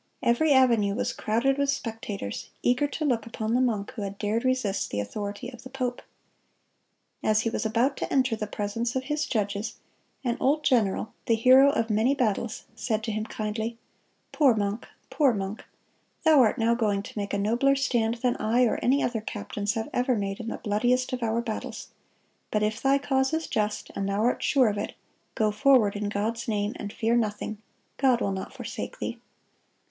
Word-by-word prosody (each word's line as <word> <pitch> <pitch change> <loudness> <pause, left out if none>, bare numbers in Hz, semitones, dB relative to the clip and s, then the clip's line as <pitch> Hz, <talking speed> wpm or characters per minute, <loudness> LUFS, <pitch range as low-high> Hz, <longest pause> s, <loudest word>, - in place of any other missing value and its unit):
Every 265 +6 +3
avenue 235 -7 +4
was - - -1
crowded 260 +6 +1
with 280 0 +1
spectators, 225 - -4
eager 250 +4 +3
to 305 +2 -3
look 240 -6 0
upon 220 0 -3
the 250 - +3
monk 215 -5 0
who 240 - -7
had 200 0 -5
dared 215 +3 -1
resist 255 -6 0
the 100 - -2
authority 205 - -4
of 245 -2 -12
the 260 - -10
pope. 255 -2 -3 1.2
As 215 0 +3
he 230 - -1
was 225 - -1
about 240 +5 +1
to - - -4
enter 255 -4 +2
the 215 -1 -4
presence 220 +4 -3
of 260 - 0
his 295 +2 -1
judges, 210 -1 -2 0.5
an 240 -1 0
old 300 +3 +2
general, 220 -5 +1
the 230 - +4
hero 255 +4 +7
of 230 -6 0
many 225 +6 +3
battles, 230 -2 -1
said 220 -3 -1
to 220 - -2
him 215 0 -2
kindly: 220 +2 -3 0.5
"Poor 275 -7 +4
monk, 205 +2 -2 0.2
poor 275 -6 +3
monk, 195 +2 -4 0.6
thou 315 -3 +6
art 245 0 +4
now 230 0 +3
going 210 -4 0
to - - -10
make 200 -1 -3
a 205 - 0
nobler 235 +7 +2
stand 240 -4 +1
than 250 -1 +2
I 230 +4 +2
or 235 - +2
any 275 +3 +3
other 235 -3 -1
captains 205 -1 -3
have 225 0 -2
ever 250 0 +2
made 195 -2 -3
in 230 - -6
the - - -3
bloodiest 245 +5 +1
of 250 - -2
our 230 0 0
battles. 225 -3 -5 0.6
But 210 0 0
if 215 +1 -1
thy 275 +1 +4
cause 265 0 0
is 320 0 -2
just, 210 0 -2
and 195 0 -2
thou 200 +2 0
art 245 - +1
sure 265 -4 +4
of 205 -1 -1
it, - - -4 0.4
go 215 -1 +2
forward 230 -3 +4
in 205 0 -2
God's 220 +3 -2
name, 210 -1 0
and 205 -2 -6
fear 230 +2 +1
nothing. 215 -2 -1 0.4
God 260 -3 +3
will 200 - 0
not 190 0 -5
forsake - - -6
thee." - - -4
225 Hz, 195 wpm, -27 LUFS, 210-255 Hz, 1.2 s, hero